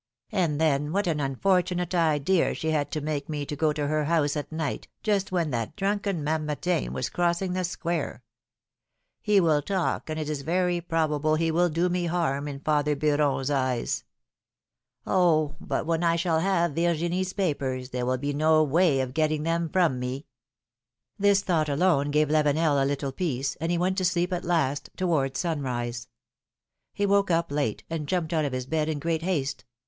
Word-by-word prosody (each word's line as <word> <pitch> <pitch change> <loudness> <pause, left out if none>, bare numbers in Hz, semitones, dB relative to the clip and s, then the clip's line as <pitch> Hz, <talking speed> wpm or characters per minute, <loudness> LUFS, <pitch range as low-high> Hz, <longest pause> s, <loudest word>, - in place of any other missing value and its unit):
'^And 165 -6 +1
then 150 -1 +1
what 200 +1 +1
an 160 -4 0
unfortunate 180 +5 0
idea 165 +1 +2
she 160 - -2
had 145 -2 0
to 155 - -3
make 145 -1 -3
me 145 -2 -3
go 150 +2 0
to 150 -1 -2
her 155 +1 0
house 155 -2 +1
at 150 +1 -4
night, 160 -3 -3 0.2
just 205 -3 0
when 170 -5 0
that 115 -3 -3
drunken 200 -4 -1
Mamertin 150 - -1
was 65 0 -2
crossing 175 +1 0
the 185 0 -1
square! 170 -1 -3 1.0
He 210 -2 +4
will 160 -5 +3
talk, 185 0 -2
and 155 0 -3
it 155 - -3
is 150 -2 -3
very 175 +3 0
probable 155 -2 +1
it 165 +1 +1
will 175 +2 +3
do 170 +3 +1
me 175 -1 -1
harm 160 -5 -1
in 140 -1 -6
father 150 -1 +1
Beuron's 145 -2 +1
eyes! 130 -3 0 1.0
Oh! 155 -5 +2
but - - -2
when 165 +1 0
I 170 -1 +3
shall 170 -1 +1
have 170 -3 +1
Virginie's 175 +3 0
papers, 135 -9 -2
there 125 -1 -2
will 130 0 +1
be 145 +2 -2
no 155 +2 +4
way 155 -1 +3
of 130 -1 -4
getting 155 0 +1
them 165 0 0
from 170 -9 +2
me 125 +3 -4 0.5
!" 120 - -53
This 200 0 +4
thought 160 -5 +1
alone 145 -1 +2
gave 150 +1 +2
Lavenel 150 -1 +2
a - - +1
little 140 0 -2
peace, 140 -5 -2
and 165 +3 -2
he 175 - +1
went 185 +3 +1
to 185 - 0
sleep 180 +1 +1
at 175 - -3
last, 145 -5 0
towards 140 -7 0
sunrise. 125 -7 -2 0.8
He 205 - -1
woke 200 -1 +3
up 165 -3 +1
late, 145 -7 -1
and 160 -3 -4
jumped 170 -1 -1
out 155 -2 +1
of 140 - -3
his 130 -1 -3
bed 155 +2 -1
in 155 - -1
great 165 +2 -1
haste. 145 -7 -2
155 Hz, 185 wpm, -26 LUFS, 145-175 Hz, 1.0 s, He